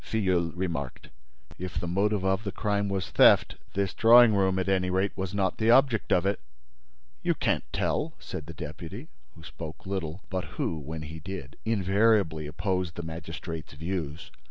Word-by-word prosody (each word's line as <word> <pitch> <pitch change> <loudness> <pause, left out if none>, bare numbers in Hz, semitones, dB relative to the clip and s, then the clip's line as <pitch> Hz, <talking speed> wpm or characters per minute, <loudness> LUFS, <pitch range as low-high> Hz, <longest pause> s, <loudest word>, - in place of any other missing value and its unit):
Filleul 95 -6 0
remarked: 85 -8 -4 0.5
"If 90 -2 -4
the - - -3
motive 100 +2 +1
of 95 +2 +1
the 100 - -3
crime 100 0 -1
was 95 -6 -2
theft, - - +5 0.2
this 100 -1 0
drawing 115 0 +7
room, 95 -2 +2
at 95 - -1
any 95 -1 +2
rate, 95 +2 0
was 95 -2 -3
not 100 -2 0
the 110 +1 +2
object 125 -2 +4
of 90 - +3
it." 100 +1 +1 0.8
"You - - +1
can't - - -1
tell!" - - -1
said 75 - -7
the 85 - -7
deputy, 80 +1 -7 0.3
who 80 - -14
spoke 80 -1 -9
little, 95 -2 -4
but 95 -2 -1
who, 80 - -1
when 80 +2 -6
he 80 +1 -8
did, 85 -6 -7
invariably 100 -6 +2
opposed 90 +2 -2
the 85 - -5
magistrate's 80 0 -7
views. 80 -1 -4
95 Hz, 170 wpm, -28 LUFS, 80-100 Hz, 0.8 s, drawing